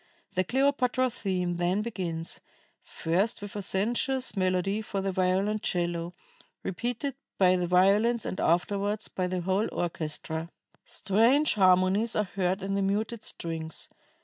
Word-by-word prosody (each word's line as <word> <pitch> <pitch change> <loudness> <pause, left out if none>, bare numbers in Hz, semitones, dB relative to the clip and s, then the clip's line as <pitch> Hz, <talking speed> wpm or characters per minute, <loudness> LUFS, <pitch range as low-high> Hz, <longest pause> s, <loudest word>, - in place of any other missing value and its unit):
The 185 -1 +2
Cleopatra 255 +1 +2
theme 180 -5 -2
then 180 +4 +1
begins, 175 -7 -4 0.4
first 185 +7 0
with 205 0 -8
a 205 - -2
sensuous 240 +8 0
melody 185 +2 +1
for 205 -2 -3
the 195 0 -1
violoncello, 180 -2 0 0.5
repeated 245 - -2 0.2
by 185 -1 +5
the 180 -1 0
violins 205 +6 +3
and - - -4
afterwards 200 +5 +1
by 185 -1 -2
the 180 0 -2
whole 190 +4 +1
orchestra. 160 -1 -3 0.4
"Strange 230 +10 +3
harmonies 190 +2 +3
are 210 - +2
heard 190 0 -1
in 195 0 -2
the 200 - +1
muted 210 +3 -1
strings. 160 -1 -4
195 Hz, 130 wpm, -28 LUFS, 180-215 Hz, 0.5 s, by